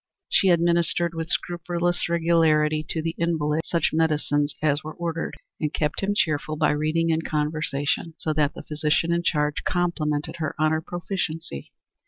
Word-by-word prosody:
She 195 - +4
administered 170 0 +2
with 165 0 -4
scrupulous 175 0 -1
regularity 160 -2 +3
to 160 - -2
the 165 0 -1
invalid 160 -2 +1
such 170 -3 +1
medicines 150 -2 +1
as 150 -1 +1
were 155 0 -7
ordered, 170 -1 -3 0.2
and 150 -2 -1
kept 150 -2 -1
him 200 +1 0
cheerful 155 -4 0
by - - +2
reading 155 +3 +1
and 160 0 0
conversation, 150 0 -1
so 155 - -1
that 150 -1 +1
the - - -8
physician 155 +2 +1
in 170 - +1
charge 150 -3 0
complimented 155 -4 -1
her 155 -3 -3
on 155 0 +2
her 160 0 +1
proficiency. 165 - -4
160 Hz, 160 wpm, -25 LUFS, 150-170 Hz, 0.2 s, She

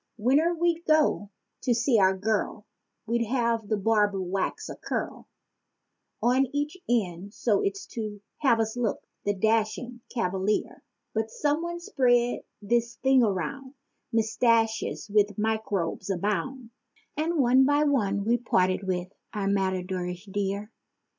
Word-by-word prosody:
Whene'er 285 +10 +3
we'd 340 0 +1
go 310 -10 +3 0.3
to 245 -3 +2
see 235 0 +3
our 190 0 +4
girl, 210 +1 -1 0.4
we'd 235 +1 +1
have 230 -3 0
the 215 - +1
barber 205 -1 +2
wax 185 +1 -2
a - - -6
curl - - -4 1.0
On 255 +3 +3
each 290 +3 -2
end 200 -4 -1
so's 200 -3 0
to 215 -3 -5 0.2
have 260 -6 +3
us 220 0 0
look, 240 -4 -1 0.2
the 205 0 +1
dashing 225 +4 0
cavalier. 195 -2 -1 0.3
But 220 0 -1
some 295 +6 0
one 345 0 -4
spread 245 -6 +2 0.2
this 235 +3 +1
thing 265 -1 +5
around—"Mustaches 225 0 -1
with 205 -1 +2
microbes 210 -5 -1
abound!" 220 +6 -2 0.4
And 325 +3 0
one 260 -1 +5
by 290 +2 +3
one 205 -9 +1
we 235 +2 +3
parted 185 -6 +1
with 180 0 -2 0.2
our 200 -2 -1
matadorish 185 -1 -1
dear. 200 +1 -3
220 Hz, 125 wpm, -27 LUFS, 200-255 Hz, 1.0 s, thing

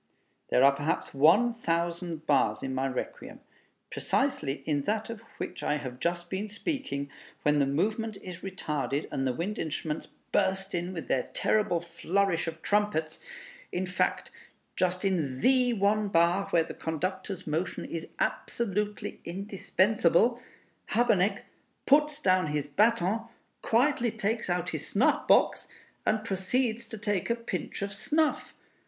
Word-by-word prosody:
There 125 - +4
are 140 - +8
perhaps 145 +3 -2
one 175 - +5
thousand 170 -5 -2
bars 140 -2 +2
in 130 - -3
my 130 +1 0
Requiem. 130 - -5 0.5
Precisely 150 - -1
in 145 -2 +1
that 220 +2 -1
of 230 - -7 0.2
which - - -5
I 150 - +1
have 125 -3 -7
just 175 0 -1
been 195 +4 -3
speaking, 215 - -3 0.3
when 150 0 +3
the 140 - +3
movement 215 +9 -1
is 180 -2 -7
retarded, 150 -7 -3
and 135 0 -1
the - - +2
wind 185 - -3
instruments 155 0 -3 0.2
burst 190 0 +1
in 175 +1 -1
with 170 -3 -6
their 125 - 0
terrible 205 -6 +2
flourish 175 0 0
of 160 0 -6
trumpets; 205 -7 0 0.5
in 185 +1 -1
fact, 180 0 -1 0.4
just 185 +1 0
in 155 -9 0
the 255 -1 +4
one 210 0 +2
bar 175 +1 +3
where 165 - +3
the - - -7
conductor's 185 +4 -3
motion 160 +4 -2
is 165 -1 -5
absolutely 210 -2 -2
indispensable, 200 +3 +2 0.5
Habeneck 215 -4 +3 0.4
puts 300 +1 +4
down 185 - +3
his 150 -1 -1
baton, 215 +6 +2 0.3
quietly 245 +1 +2
takes 220 -1 -2
out 175 0 0
his 155 -2 -4
snuff 210 +6 +2
box, - - +4 0.4
and 215 0 +2
proceeds 230 +3 0
to 225 - -7
take 205 -2 -1
a 235 - +3
pinch 230 -3 -4
of 200 0 -2
snuff. 305 +9 0
185 Hz, 145 wpm, -29 LUFS, 160-215 Hz, 0.5 s, are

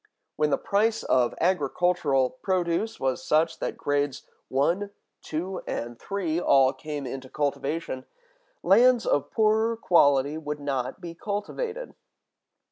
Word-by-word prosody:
When 150 0 +1
the 140 - +2
price 220 +3 +1
of 125 -2 +2
agricultural 155 -5 +1
produce 185 +3 -1
was 130 -1 -1
such 160 +1 +1
that - - -3
grades 145 -1 -1 0.2
one, 170 +10 0 0.3
two, 180 +4 -4
and 120 0 -4
three 180 -5 -2
all 135 -6 +4
came 150 -2 -6
into 130 +1 -6
cultivation, 140 -1 -2 0.6
lands 245 -1 +5
of 145 - +1
poorer 220 +1 +2
quality 145 -6 +3
would 150 -1 -5
not 135 0 -3
be 170 -2 -7
cultivated. 445 - -4
155 Hz, 125 wpm, -26 LUFS, 140-200 Hz, 0.6 s, lands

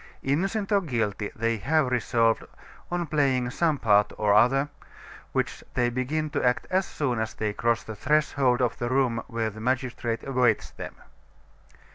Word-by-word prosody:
Innocent 195 +9 0
or 200 -1 +4
guilty, 110 - -2
they 115 +1 0
have 140 +5 +1
resolved, 115 -2 +2 0.5
on 175 0 -1
playing 135 -5 +1
some 160 +1 +1
part 105 -4 +3
or 105 -1 +3
other, 135 +6 +4 0.6
which - - -2
they 120 -1 +2
begin 145 +5 -2
to - - -1
act 125 -1 +2
as 190 +1 +2
soon 125 -6 -1
as 110 0 -3
they 105 -1 -2
cross 115 +2 0
the 110 - -7
threshold 135 -1 +2
of 120 - -1
the 120 - -1
room 130 -3 +1
where 115 -2 -2
the 110 +1 -10
magistrate 125 -1 -1
awaits 125 -5 +1
them. - - -8
125 Hz, 160 wpm, -26 LUFS, 115-145 Hz, 0.6 s, or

